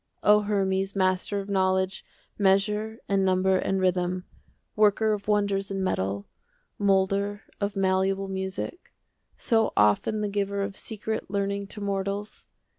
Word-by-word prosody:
O 210 0 +6
Hermes, 195 -1 0
master 185 +1 +1
of 195 - -6
knowledge, 190 -1 +1 0.4
Measure 210 +3 +2
and 195 -1 +2
number 190 0 +3
and 190 +1 0
rhythm, 180 0 0 0.5
Worker 215 +1 +3
of 205 -1 -5
wonders 200 -2 +1
in 195 -1 -2
metal, 100 - -1 0.5
15 205 - 0
Moulder 200 +2 +1 0.2
of 200 -1 -2
malleable 195 0 +1
music, 190 - -5 0.4
So 225 -1 +2
often 105 - +3
the 210 - 0
giver 200 0 -1
of 200 0 -4
secret 220 -1 -5
Learning 200 0 -1
to 210 +1 -9
mortals! 200 +1 -3
195 Hz, 135 wpm, -26 LUFS, 190-205 Hz, 0.5 s, O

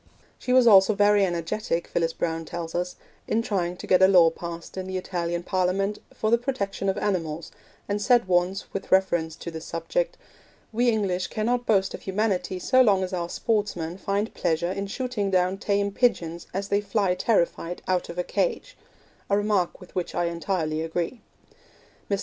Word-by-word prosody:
She 250 - -3
was 255 -1 +6
also 200 -1 +7
very 205 0 +4
energetic, 175 0 -1
Phyllis 165 -1 0
Browne 165 -1 -2
tells 165 0 -6
us, 180 +1 -2 0.3
in 225 +1 +1
trying 180 -5 -1
to - - -8
get 185 - +4
a 190 - +8
law 175 -4 +6
passed 170 0 -8
in 185 0 -4
the 190 0 -3
Italian 175 -2 -3
Parliament 190 +3 0
for 215 - -1
the 235 - +5
protection 200 -6 -2
of 190 - -1
animals, 165 -5 -2 0.4
and 205 0 -1
said 240 -2 +4
once, 180 +1 +1
with 195 - -5
reference 175 -4 +2
to 170 - -7
this 160 0 -7
subject, - - -2 0.6
'We 240 +2 +3
English 195 -5 0
cannot 240 +2 -1
boast 195 -3 +2
of - - -7
humanity 190 -2 -1
so 255 +8 +4
long 200 -6 +4
as 185 - -4
our 175 -1 -2
sportsmen 195 -7 -1
find 200 +3 -1
pleasure 170 0 0
in 200 +1 -3
shooting 225 -2 -2
down 185 0 +1
tame 200 -2 0
pigeons 170 -7 0
as 195 +2 -3
they 200 +1 +2
fly 200 -2 +1
terrified 175 -4 0
out 185 -1 0
of 170 - -7
a 180 - 0
cage' - - -2 0.5
a 200 - +3
remark 205 -4 0
with 180 - -14
which 180 -2 -3
I 175 - +1
entirely 170 -2 -1
agree. 170 +8 -3 0.9
Mr. 200 -1 +1
190 Hz, 180 wpm, -25 LUFS, 175-210 Hz, 0.9 s, a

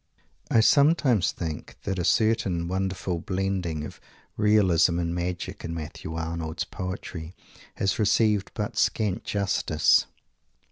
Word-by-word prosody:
I 110 - +5
sometimes 140 - +4
think 80 -3 -6
that 95 -2 -2
a - - 0
certain 100 -5 +1
wonderful 95 -1 -2
blending 95 -4 -2
of - - -10 0.3
realism 95 -5 +3
and 85 -1 -1
magic 90 +2 -4
in 85 0 -4
Matthew 80 0 -6
Arnold's 80 0 -3
poetry 90 -2 -6 0.4
has 100 - 0
received 105 -1 +2
but 105 -2 -3
scant 105 -4 +1
justice. 100 -6 +2
95 Hz, 120 wpm, -26 LUFS, 85-105 Hz, 0.4 s, I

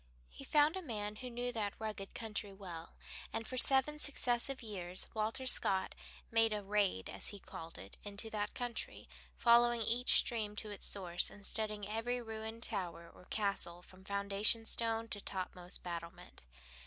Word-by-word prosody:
He 60 - -10
found 300 +2 +4
a 380 - -3
man 210 - -4
who 250 +1 -6
knew 245 +1 -3
that 210 -4 -2
rugged 215 -3 -5
country 210 -2 -3
well, 180 -4 -9 0.4
and 225 - -3
for 255 - -5
seven 270 +4 +4
successive 260 -2 +2
years 185 -4 0
Walter 225 +4 -1
Scott 190 -6 +2 0.4
made 225 -1 +5
a 210 -1 -3
"raid," 200 - +1
as 95 - 0
he 205 - 0
called 165 -3 -9
it, 95 - -9
into 205 +2 -5
that 210 -1 -2
country, 245 -2 -3 0.3
following 235 -1 +5
each 240 +3 +4
stream 215 -4 +1
to 210 0 -4
its 205 - -2
source, 175 -3 +1
and 205 - -6
studying 210 -2 +2
every 225 +3 -1
ruined 220 0 -6
tower 175 -5 -3
or - - -16
castle 195 -5 -1
from 185 +1 -15
foundation 200 +3 +2
stone 225 0 +1
to 205 - 0
topmost 180 -2 -1
battlement. 170 - -7
210 Hz, 165 wpm, -36 LUFS, 195-235 Hz, 0.4 s, made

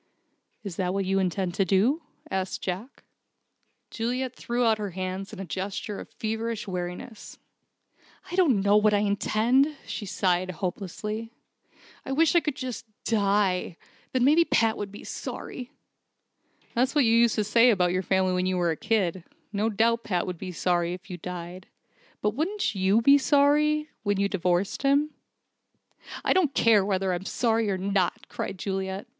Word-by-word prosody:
"Is 195 -5 -6
that 185 0 -1
what 195 -1 0
you 195 +1 +1
intend 185 -1 -1
to 195 - +2
do?" 210 - +2 0.3
asked 190 0 -2
Jack. 195 +8 -5 0.9
Juliet 250 +2 -2
threw 240 0 -1
out 220 -1 +3
her 205 -1 -3
hands 185 +1 -4
in 215 - -9
a 195 - -4
gesture 195 +4 -4
of - - -9
feverish 220 0 -3
weariness. 180 +4 -6 0.9
"I - - -3
don't 295 - +4
know 205 +1 +4
what 210 0 +4
I 205 - +2
intend," 230 +8 +2
she 205 - -5
sighed, 185 -1 0
hopelessly, 200 +5 -4 0.7
"I 270 - -4
wish 320 +3 +3
I 345 - +6
could 300 -4 -3
just 250 -3 -6 0.2
die. 200 -5 +1 0.3
Then 255 -1 +1
maybe 305 +6 +6
Pat 225 -8 +2
would 200 -1 -5
be 205 - -10
sorry." 250 -1 -6 1.0
"That's 255 +5 +1
what 290 -4 +4
you 225 - +4
used 235 -1 +4
to 215 - +1
say 230 +4 +5
about 180 -6 +3
your 185 +1 0
family 190 0 +1
when 180 0 0
you 185 0 0
were 175 -1 +2
a - - -1
kid. 190 -4 0 0.3
No 210 +2 +1
doubt 230 +2 +2
Pat 180 -5 0
would 180 -3 -5
be 185 -1 -5
sorry 175 0 0
if 185 +2 -13
you 180 - -5
died. 180 +1 -7 0.6
But 210 - +2
wouldn't 365 - -1
you 195 +3 +2
be 280 +3 +7
sorry 295 +2 +3
when 205 -2 0
you'd 200 0 +1
divorced 180 0 0
him?" 285 +2 +2 1.1
"I - - +4
don't 320 -8 +2
care 220 -4 +5
whether 190 -1 0
I'm 180 +2 -4
sorry 225 -2 +1
or 190 - 0
not," 190 -1 -1
cried 195 - -5
Juliet. 190 0 -3
205 Hz, 170 wpm, -26 LUFS, 185-235 Hz, 1.1 s, be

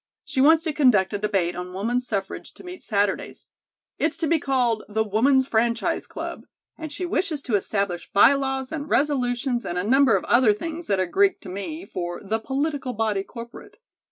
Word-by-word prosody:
She 290 -2 -1
wants 320 +3 +5
to 315 -3 -1
conduct 240 -10 +3
a 205 - -1
debate 195 -4 0
on 180 0 -6
Woman's 240 +6 -1
Suffrage 195 -4 -4
to - - -14
meet 360 0 -9
Saturdays. 205 -2 -1 0.5
It's 320 0 0
to 330 -1 -1
be 330 +1 +2
called 250 -6 0
'The 220 +1 +1
Woman's 260 +6 +2
Franchise 230 0 0
Club,' - - -7 0.3
and 315 -2 -7
she 360 +5 -3
wishes 340 -4 -1
to 245 - -4
establish 200 -3 -1
by 205 +7 +6
laws 270 -1 -2
and 305 -2 -5
resolutions 250 -3 0
and 175 - -4
a 180 - 0
number 260 +1 +4
of 190 - 0
other 240 -3 +4
things 325 +9 -6
that 195 -2 +1
are 185 - +2
Greek 395 - +2
to 190 - -9
me, 310 - -6
for 175 -1 -5
'the 220 +3 -1
political 275 +1 -2
body 215 -3 0
corporate.' 235 - -11
245 Hz, 190 wpm, -24 LUFS, 205-290 Hz, 0.5 s, by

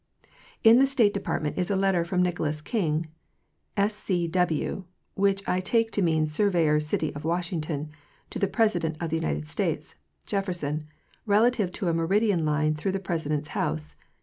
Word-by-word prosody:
In 225 +1 +8
the 270 - +5
State 235 -7 +3
Department 155 -5 -2
is 180 - -1
a 200 - +1
letter 190 -3 +2
from 180 +1 +1
Nicholas 160 -4 -1
King, 160 -1 -1 0.7
S.C. 200 -4 0
W. 180 +1 0 0.3
(which 195 0 +1
I 180 - +1
take 225 +4 +1
to 205 - 0
mean 160 -3 +2
surveyor 160 -2 +2
city 150 +1 -2
of 145 - -7
Washington), 160 -3 -2 0.4
to - - -4
the 200 - +2
President 175 -9 +1
of 170 -2 -3
the 160 - +1
United 75 - -2
States - - -2 0.3
(Jefferson) 165 -6 -2 0.4
relative 210 -2 +3
to 190 - -3
a 170 - +2
meridian 185 +2 +2
line 155 0 +1
through 185 +5 -2
the 195 - -1
President's 155 -5 -2
house. 75 0 -2
175 Hz, 160 wpm, -26 LUFS, 155-200 Hz, 0.7 s, In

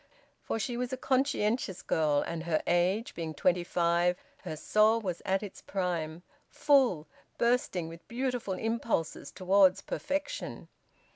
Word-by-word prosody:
For - - -2
she 235 +2 -2
was 245 0 -2
a 260 - -2
conscientious 255 -7 0
girl, 150 -2 +2
and 165 0 -4
her 160 -2 0
age 185 +6 +1
being 160 -2 -5
twenty 180 +4 +2
five 175 +1 +2 0.2
her 155 - -6
soul 215 +7 +3
was 185 -6 -4
at 190 +2 +1
its 200 - -8
prime, 175 -3 -3 0.3
full, 260 - +3 0.3
bursting 235 -8 +1
with 165 +1 -11
beautiful 245 -5 -2
impulses 225 -6 -2
towards 190 0 +4
perfection. 290 - -4
190 Hz, 135 wpm, -30 LUFS, 170-235 Hz, 0.3 s, towards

